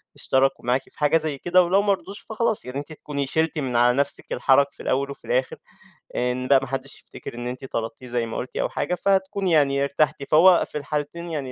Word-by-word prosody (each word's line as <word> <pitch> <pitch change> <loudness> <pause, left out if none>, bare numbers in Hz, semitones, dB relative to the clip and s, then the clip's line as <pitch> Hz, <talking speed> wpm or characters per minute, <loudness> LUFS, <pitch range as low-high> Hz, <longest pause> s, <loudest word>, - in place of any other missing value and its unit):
اشتركوا 135 -1 +1
معاكِ 125 +2 +2
في - - -22
حاجة 150 +2 +4
زي 155 -3 -3
كده 180 +4 +3
ولو 185 +3 +3
ما 205 -1 +3
رضوش 195 +1 -7
فخلاص، 220 -1 -1
يعني 125 +2 -6
أنتِ 145 +2 -9
هتكوني 145 -2 -4
شِلتِ 160 +3 0
من 130 -4 -3
على 120 +1 +4
نفسِك 140 0 -2
الحَرج 135 +3 +4
في - - -12
الأول 140 +2 0
وفي - - -11
الآخر 130 +1 0 0.6
آآ، 125 0 +1
إن 130 +1 -4
لأ، 140 0 +6
ما 135 - -5
حدّش 135 +1 -6
يفتكر - - -10
إن 120 0 -5
أنتِ 125 +2 -6
طلبتيه 115 0 -5
زي 120 -1 -1
ما 115 - -5
قلتِ 125 - -6
أو - - 0
حاجة، 180 - -2
فهتكون 195 +1 0
يعني 140 -4 +3
ارتحتِ 140 +1 0
فوق 175 +3 +6
في - - -6
الحالتين 150 +4 -4
يعني 140 -5 -4
140 Hz, 225 wpm, -23 LUFS, 130-170 Hz, 0.6 s, لأ